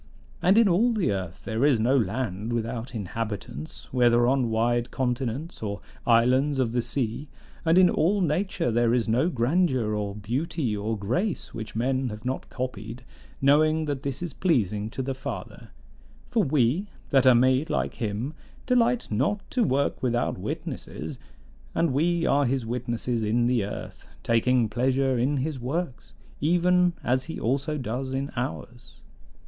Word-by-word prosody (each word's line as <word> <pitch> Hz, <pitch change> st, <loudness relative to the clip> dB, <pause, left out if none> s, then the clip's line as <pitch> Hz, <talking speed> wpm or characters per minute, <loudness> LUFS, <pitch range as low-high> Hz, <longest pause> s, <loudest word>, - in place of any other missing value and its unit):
And 190 Hz, +4 st, +4 dB
in 230 Hz, -2 st, +6 dB
all 215 Hz, +7 st, +3 dB
the 205 Hz, -, +1 dB
earth 95 Hz, -2 st, -5 dB
there 110 Hz, +3 st, -1 dB
is 140 Hz, -5 st, +4 dB
no 120 Hz, +5 st, +3 dB
land 110 Hz, -2 st, -1 dB
without 115 Hz, +1 st, -3 dB
inhabitants, 105 Hz, -, -5 dB
whether 120 Hz, -1 st, +4 dB
on 130 Hz, -1 st, +2 dB
wide 120 Hz, +2 st, +1 dB
continents 130 Hz, +5 st, -3 dB
or 100 Hz, -2 st, -3 dB, 0.3 s
islands 130 Hz, +5 st, +4 dB
of 125 Hz, -4 st, +1 dB
the 120 Hz, +1 st, +1 dB
sea; 130 Hz, +3 st, -3 dB, 0.3 s
and 165 Hz, +1 st, +3 dB
in 185 Hz, -1 st, +7 dB
all 185 Hz, +4 st, +2 dB
nature 175 Hz, -, 0 dB
there 120 Hz, +1 st, +3 dB
is 120 Hz, -2 st, 0 dB
no 125 Hz, +9 st, +2 dB
grandeur 130 Hz, -4 st, +1 dB
or 105 Hz, -1 st, -2 dB
beauty 120 Hz, -, -2 dB
or 105 Hz, +2 st, -2 dB
grace 160 Hz, -, -2 dB
which 110 Hz, -1 st, -7 dB
men 130 Hz, +2 st, 0 dB
have 105 Hz, +2 st, -8 dB
not 130 Hz, +1 st, -3 dB
copied; 120 Hz, -1 st, -5 dB, 0.4 s
knowing 155 Hz, +3 st, +4 dB
that 145 Hz, -3 st, -3 dB
this 140 Hz, +4 st, -3 dB
is 175 Hz, -, -5 dB
pleasing 110 Hz, -, 0 dB
to 130 Hz, -, -4 dB
the 135 Hz, +1 st, -2 dB
Father: 130 Hz, +1 st, -7 dB, 0.6 s
for 230 Hz, -4 st, +1 dB
we, 145 Hz, -, +1 dB, 0.2 s
that 135 Hz, -1 st, +4 dB
are 130 Hz, -, +8 dB
made 130 Hz, +5 st, +3 dB
like -, -, -1 dB
him, 115 Hz, +5 st, -3 dB, 0.3 s
delight 245 Hz, -1 st, +2 dB
not 140 Hz, -, 0 dB
to 250 Hz, -, +2 dB
work 140 Hz, -7 st, 0 dB
without 120 Hz, -1 st, 0 dB
witnesses; -, -, -6 dB, 0.6 s
and 165 Hz, -6 st, +2 dB
we 170 Hz, +4 st, +1 dB
are 140 Hz, -1 st, +3 dB
his 130 Hz, -1 st, -1 dB
witnesses 120 Hz, 0 st, -2 dB
in 115 Hz, +3 st, +2 dB
the 120 Hz, -3 st, +2 dB
earth, 100 Hz, -, -7 dB
taking 120 Hz, +1 st, +3 dB
pleasure 130 Hz, +3 st, +1 dB
in 140 Hz, +4 st, +1 dB
his 140 Hz, +1 st, -2 dB
works, 135 Hz, +2 st, -4 dB, 0.2 s
even 180 Hz, +3 st, +3 dB
as 130 Hz, +1 st, +1 dB
he 160 Hz, -, -6 dB
also 140 Hz, +5 st, -1 dB
does 130 Hz, +1 st, -3 dB
in 140 Hz, +2 st, -2 dB
ours. 120 Hz, 0 st, -6 dB
130 Hz, 160 wpm, -26 LUFS, 115-150 Hz, 0.6 s, are